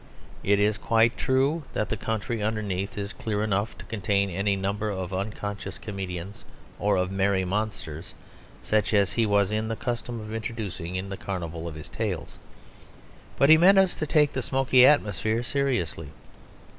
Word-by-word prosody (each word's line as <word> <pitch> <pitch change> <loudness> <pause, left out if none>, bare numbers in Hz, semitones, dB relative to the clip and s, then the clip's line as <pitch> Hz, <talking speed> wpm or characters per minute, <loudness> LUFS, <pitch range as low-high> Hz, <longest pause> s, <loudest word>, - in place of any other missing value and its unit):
It 100 0 +3
is 105 0 +2
quite 115 +1 +3
true 135 +5 +1
that 105 - -1
the - - 0
country 110 +1 -3
underneath 105 -1 -2
is 100 +1 -4
clear 105 -2 -2
enough 100 -2 -1
to 95 - -11
contain 100 -2 0
any 100 +3 0
number 100 +2 -2
of 95 -2 -4
unconscious 100 +1 -4
comedians 95 -2 -6 0.4
or 105 0 +2
of 90 +1 0
merry 95 -1 +1
monsters 90 -5 -4 0.5
such 110 0 +1
as 100 -2 +3
he 115 -2 +2
was 100 -1 +2
in 110 +1 -1
the 115 - -2
custom 120 -1 -4
of 110 0 -7
introducing 110 -6 -4
into 95 +1 -4
the 95 - -7
carnival 85 -3 -4
of 80 - -6
his 75 - -9
tales. - - -4 1.0
But 140 - +4
he 160 - +10
meant 195 +3 +7
us 190 -2 +5
to 155 - -2
take 150 -1 +3
the 130 - -1
smoky 130 0 +5
atmosphere 110 - +2
seriously. 125 - -1
105 Hz, 170 wpm, -26 LUFS, 95-115 Hz, 1.0 s, he